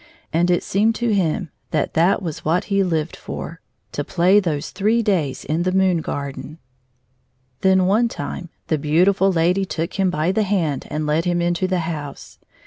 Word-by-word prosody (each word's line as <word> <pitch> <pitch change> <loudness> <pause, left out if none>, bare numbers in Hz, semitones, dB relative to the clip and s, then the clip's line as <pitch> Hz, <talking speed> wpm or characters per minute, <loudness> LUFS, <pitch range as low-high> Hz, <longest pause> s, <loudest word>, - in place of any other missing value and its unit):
And 170 +2 +2
it 175 - +2
seemed 220 +3 +1
to 235 -2 0
him 180 -2 0 0.2
that 150 - -1
that 185 +5 +2
was 160 -4 -5
what 170 +4 +1
he 200 - +3
Uved 165 -4 0
for, 165 0 -7 0.2
— - - -47
to 145 - -3
play 185 +6 +4
those 155 -7 -2
three 220 +4 +1
days 165 -11 0
in 155 +4 -1
the 185 +1 +1
moon 190 -1 +3
garden. 145 +2 -5 1.0
Then 190 -1 +3
one 215 +6 +3
time 180 -6 -6 0.2
the 155 - 0
beautifiil 185 +6 +3
lady 175 +4 +2
took 170 0 -4
him 190 -1 +3
by 160 +1 0
the 215 - +1
hand 180 -9 -1
and 155 0 -2
led 155 +3 +1
him 175 -1 +1
into 175 +2 0
the 185 -1 0
house. 150 -4 -6
175 Hz, 185 wpm, -21 LUFS, 160-195 Hz, 1.0 s, play